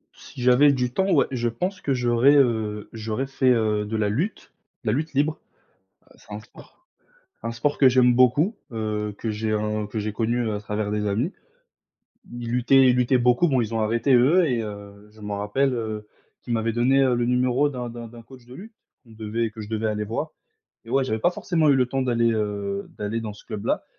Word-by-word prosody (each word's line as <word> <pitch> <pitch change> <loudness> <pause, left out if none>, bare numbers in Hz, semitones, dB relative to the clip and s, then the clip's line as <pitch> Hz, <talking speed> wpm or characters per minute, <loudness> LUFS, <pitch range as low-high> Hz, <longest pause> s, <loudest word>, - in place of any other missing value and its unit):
Si - - -11
j'avais 130 +3 +6
du 125 -2 -1
temps, 190 +6 +1
ouais. - - +4
Je 120 -2 -1
pense 185 - -4
que 140 - 0
j'aurais, 125 +2 +3
heu, 110 -6 +1
j'aurais 110 +3 -3
fait, 135 -1 +1
heu, 110 -3 +1
de 110 +1 -3
la 105 -1 0
lutte, 165 - -3 0.3
la 110 - 0
lutte 155 +7 -2
libre. 150 +3 0 0.8
C'est - - -19
un 105 - -5
sport 110 - -17 0.7
c'est - - -5
un - - -2
sport 120 +5 -1
que 135 - +6
j'aime 125 -1 +4
beaucoup, 130 - +3 0.2
heu, 105 -2 -3
que 115 - -3
j'ai 110 +1 -2
un 105 0 -1
que 110 +1 -4
j'ai 105 +1 -3
connu 115 +2 -1
à 105 - -3
travers 105 0 -3
des 105 0 -1
amis. 110 - -1 1.1
Ils 120 -1 -5
luttaient 130 +2 +4
ils 125 - +2
luttaient 125 +1 +3
beaucoup, 125 +7 +3
bon, 130 -4 +2
ils 115 0 -5
ont 110 - 0
arrêté 115 +5 +1
eux 150 +9 +4
et 125 -5 0
heu, 100 -1 -9
je 110 +1 -19
m'en 105 -1 -4
rappelle, 130 +7 0
heu, 110 -2 -4 0.4
qu'ils 120 - -5
m'avaient 115 0 0
donné 130 +4 +3
le 120 -2 +2
numéro 125 +3 +1
d'un 125 -2 -5
d'un 115 0 -8
d'un 115 0 -13
coach 130 +1 -16
de 125 - -12
lutte, 220 - -11 0.3
qu'on 115 - -18
devait 110 +1 -3
que 110 0 -9
je 105 - -9
devais 110 0 -1
aller 105 0 -1
voir 110 +3 -4 0.5
et 115 - -12
ouais, 135 +1 +2
j'avais 110 -3 -2
pas 175 - +3
forcément 165 -3 0
eu 140 - +5
le 130 -2 +2
temps 135 +1 -2
d'aller, 115 -2 +1
heu, 100 -2 -3
d'aller 105 +2 -3
dans 110 -2 -5
ce 105 - -16
club-là, 105 - -3
115 Hz, 220 wpm, -24 LUFS, 110-130 Hz, 1.1 s, j'avais